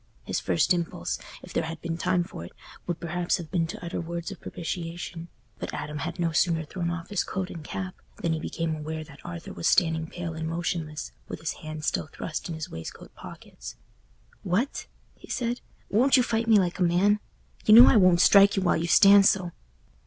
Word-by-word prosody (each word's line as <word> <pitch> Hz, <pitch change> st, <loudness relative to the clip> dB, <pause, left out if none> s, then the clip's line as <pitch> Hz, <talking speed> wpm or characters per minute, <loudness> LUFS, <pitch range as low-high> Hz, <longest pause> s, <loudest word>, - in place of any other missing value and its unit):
His -, -, -2 dB
first -, -, +2 dB
impulse, 165 Hz, -, -3 dB, 0.2 s
if -, -, -11 dB
there 165 Hz, -, 0 dB
had 160 Hz, 0 st, -6 dB
been 165 Hz, -1 st, -3 dB
time 175 Hz, +1 st, +1 dB
for 85 Hz, -, -9 dB
it, 85 Hz, -, -11 dB, 0.3 s
would 175 Hz, -2 st, -2 dB
perhaps 170 Hz, +1 st, -1 dB
have 165 Hz, -3 st, -9 dB
been 170 Hz, -3 st, +1 dB
to 175 Hz, -, -7 dB
utter 170 Hz, -, -3 dB
words 170 Hz, 0 st, -5 dB
of -, -, -10 dB
propitiation; 170 Hz, 0 st, -5 dB, 0.3 s
but -, -, -5 dB
Adam 150 Hz, 0 st, -5 dB
had 170 Hz, +4 st, -4 dB
no 170 Hz, -1 st, +1 dB
sooner 160 Hz, 0 st, +1 dB
thrown 170 Hz, +2 st, -3 dB
off 170 Hz, -1 st, -5 dB
his 205 Hz, -3 st, 0 dB
coat 185 Hz, -1 st, -4 dB
and 165 Hz, -, -8 dB
cap 185 Hz, +4 st, -5 dB, 0.2 s
than 165 Hz, -1 st, -1 dB
he 160 Hz, -, -2 dB
became 165 Hz, 0 st, -3 dB
aware 155 Hz, +1 st, -5 dB
that 150 Hz, -2 st, -15 dB
Arthur 85 Hz, -1 st, -7 dB
was 85 Hz, -, -2 dB
standing 160 Hz, -1 st, +2 dB
pale 170 Hz, 0 st, -5 dB
and 160 Hz, 0 st, -4 dB
motionless, 165 Hz, -2 st, -3 dB, 0.2 s
with -, -, -6 dB
his 160 Hz, -, -3 dB
hands 155 Hz, -1 st, -6 dB
still -, -, 0 dB
thrust 160 Hz, +2 st, -5 dB
in 165 Hz, -, -4 dB
his 160 Hz, -1 st, -5 dB
waistcoat 80 Hz, 0 st, -9 dB
pockets. -, -, -10 dB, 0.7 s
"What!" 210 Hz, +10 st, -1 dB, 0.3 s
he -, -, -17 dB
said, 240 Hz, 0 st, -2 dB, 0.3 s
"won't 255 Hz, +7 st, +5 dB
you 250 Hz, -, +4 dB
fight 225 Hz, -1 st, -1 dB
me 220 Hz, -2 st, +6 dB
like 180 Hz, -3 st, 0 dB
a -, -, -3 dB
man? 180 Hz, +4 st, +3 dB, 0.5 s
You 215 Hz, -, +9 dB
know 240 Hz, +2 st, +12 dB
I -, -, +6 dB
won't 185 Hz, -3 st, +5 dB
strike 200 Hz, 0 st, +7 dB
you 195 Hz, -, +1 dB
while 175 Hz, -, +3 dB
you 165 Hz, +2 st, -2 dB
stand 200 Hz, +2 st, +7 dB
so." 180 Hz, -3 st, +1 dB
170 Hz, 210 wpm, -27 LUFS, 160-185 Hz, 0.7 s, know